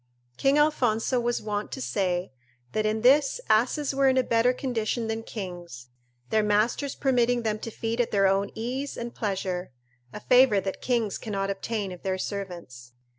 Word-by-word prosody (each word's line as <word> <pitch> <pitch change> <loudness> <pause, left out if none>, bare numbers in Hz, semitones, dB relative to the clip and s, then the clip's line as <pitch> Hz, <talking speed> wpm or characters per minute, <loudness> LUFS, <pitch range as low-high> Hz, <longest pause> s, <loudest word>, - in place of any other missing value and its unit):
King 275 - +2
Alfonso 255 -5 +2
was 240 -1 -1
wont 210 -1 -3
to - - -5
say, 185 -6 -1 0.4
that 215 0 0
in 215 +1 -1
this 275 - +4
asses 260 +6 +2
were 275 0 +3
in 260 - +2
a 260 - +4
better 235 +1 +3
condition 240 -3 -2
than 225 0 -2
kings, 175 - -8 0.4
their 220 - +4
masters 215 +7 +1
permitting 245 -2 +2
them 215 -1 -1
to 230 - -6
feed 225 +2 -2
at 235 - -1
their 195 -1 +2
own 195 +1 +2
ease 255 +5 -4
and 235 0 -5
pleasure, 190 - -3 0.4
a - - -7
favour 250 -2 +5
that 195 0 -5
kings 235 -5 0
cannot 195 -2 -2
obtain 200 0 -3
of 180 - -9
their 190 -1 -1
servants. 175 - -6
220 Hz, 175 wpm, -26 LUFS, 195-245 Hz, 0.4 s, favour